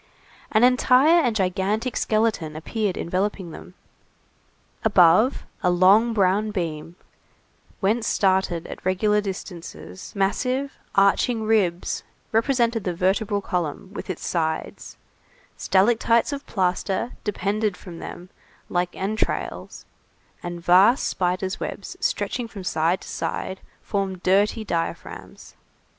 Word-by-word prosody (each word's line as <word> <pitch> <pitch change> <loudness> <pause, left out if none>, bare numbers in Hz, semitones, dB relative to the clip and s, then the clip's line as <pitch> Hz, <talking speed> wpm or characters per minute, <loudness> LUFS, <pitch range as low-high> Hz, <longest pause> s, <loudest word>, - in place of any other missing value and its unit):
An 215 +1 +4
entire 255 +6 +5
and 240 -7 0
gigantic 200 +5 0
skeleton 215 -8 0
appeared 200 +4 -2
enveloping 185 0 -2
them. 180 - -11 1.1
Above, 205 +4 +4 0.2
a 180 - +2
long 195 +6 +5
brown 205 0 +2
beam, 165 -4 -4 0.9
whence 220 +3 +1
started 190 -3 +1
at - - -9
regular 210 +3 +2
distances, 175 - -8
massive, 255 +8 0 0.2
arching 220 +4 +3
ribs, 200 -6 +1 0.3
represented 230 -1 +1
the 180 -2 -2
vertebral 200 +3 +1
column 180 0 -3
with - - -7
its 185 - -4
sides, 160 -2 -3 0.6
stalactites 230 +6 +2
of 280 0 -6
plaster 190 +3 -1
depended 210 -1 -1
from 170 -4 -10
them 180 +1 -9 0.4
like 175 0 -1
entrails, 205 +3 -3 0.6
and 175 0 -6
vast 195 +9 +5
spiders' 185 +2 -1
webs - - -6
stretching 245 -2 -1
from 205 -4 -9
side 170 +1 0
to - - -11
side, 190 0 -4 0.2
formed 190 -2 -3
dirty 205 +4 +2
diaphragms. 170 -5 -5
195 Hz, 110 wpm, -24 LUFS, 180-220 Hz, 1.1 s, entire